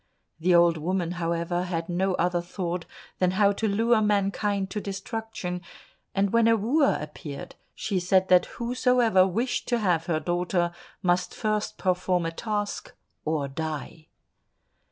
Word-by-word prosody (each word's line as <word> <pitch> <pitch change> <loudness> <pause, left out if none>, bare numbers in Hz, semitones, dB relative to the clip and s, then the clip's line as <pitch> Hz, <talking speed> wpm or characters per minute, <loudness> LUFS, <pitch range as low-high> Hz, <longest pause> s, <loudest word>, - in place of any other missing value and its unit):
The 175 +2 +3
old 170 -1 +5
woman, 175 +2 -1
however, 170 0 -1
had 165 -2 -3
no 185 +2 0
other 175 0 +1
thought 175 -1 -4 0.3
than 185 - +3
how 200 -1 +5
to 220 +2 -1
lure 225 +2 +3
mankind 200 -1 0
to 210 - -3
destruction, 195 -2 -5 0.5
and 195 +1 +1
when 230 -1 +5
a 230 - +5
wooer 275 +8 +2
appeared, 150 -1 -7 0.2
she 195 -3 -1
said 185 +1 +3
that 180 -1 +5
whosoever 240 -5 +3
wished 230 +7 -1
to 240 - +2
have 180 -7 +1
her 160 -3 +1
daughter, 175 +1 0 0.3
must 180 0 +1
first 215 -1 -1
perform 180 -2 +1
a 165 - -1
task, 205 +3 -3 0.3
or 155 -2 0
die. 155 +2 -5
185 Hz, 145 wpm, -26 LUFS, 175-210 Hz, 0.5 s, old